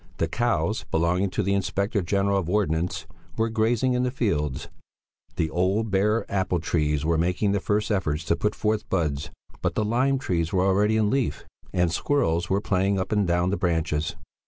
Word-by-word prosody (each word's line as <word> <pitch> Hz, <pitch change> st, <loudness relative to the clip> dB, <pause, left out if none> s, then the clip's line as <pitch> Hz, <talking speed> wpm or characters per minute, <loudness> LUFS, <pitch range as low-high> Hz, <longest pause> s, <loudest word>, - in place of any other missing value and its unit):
The 80 Hz, -, 0 dB
cows 105 Hz, -1 st, 0 dB
belonging 85 Hz, +4 st, +1 dB
to 105 Hz, -, -1 dB
the 100 Hz, +1 st, +1 dB
Inspector 100 Hz, +2 st, 0 dB
General 100 Hz, +2 st, +1 dB
of 85 Hz, -3 st, -4 dB
Ordnance 85 Hz, -4 st, 0 dB, 0.3 s
were 115 Hz, 0 st, +1 dB
grazing 115 Hz, +3 st, +1 dB
in 125 Hz, -, +1 dB
the 125 Hz, -, +1 dB
fields; 75 Hz, -, -1 dB, 0.7 s
the 80 Hz, -1 st, -1 dB
old, 95 Hz, +5 st, 0 dB
bare 105 Hz, +4 st, +2 dB
apple 95 Hz, -3 st, 0 dB
trees 75 Hz, -2 st, 0 dB
were 80 Hz, 0 st, +2 dB
making 90 Hz, +4 st, +1 dB
the 100 Hz, -, +1 dB
first 105 Hz, +3 st, 0 dB
efforts 80 Hz, -6 st, 0 dB
to 85 Hz, -, +2 dB
put 105 Hz, +4 st, -1 dB
forth 105 Hz, 0 st, -1 dB
buds; 75 Hz, -6 st, -1 dB, 0.3 s
but -, -, -1 dB
the 110 Hz, -, +1 dB
lime 130 Hz, +5 st, +2 dB
trees 85 Hz, -, -1 dB
were 95 Hz, 0 st, +2 dB
already 105 Hz, +3 st, +3 dB
in 105 Hz, -1 st, +2 dB
leaf 135 Hz, -3 st, -1 dB, 0.3 s
and 90 Hz, -2 st, +1 dB
squirrels 85 Hz, -, 0 dB
were 95 Hz, -, +2 dB
playing 95 Hz, 0 st, +1 dB
up 95 Hz, -, -3 dB
and 105 Hz, -3 st, +2 dB
down 85 Hz, +1 st, +1 dB
the 100 Hz, -, 0 dB
branches. 80 Hz, -2 st, -1 dB
95 Hz, 185 wpm, -25 LUFS, 85-105 Hz, 0.7 s, already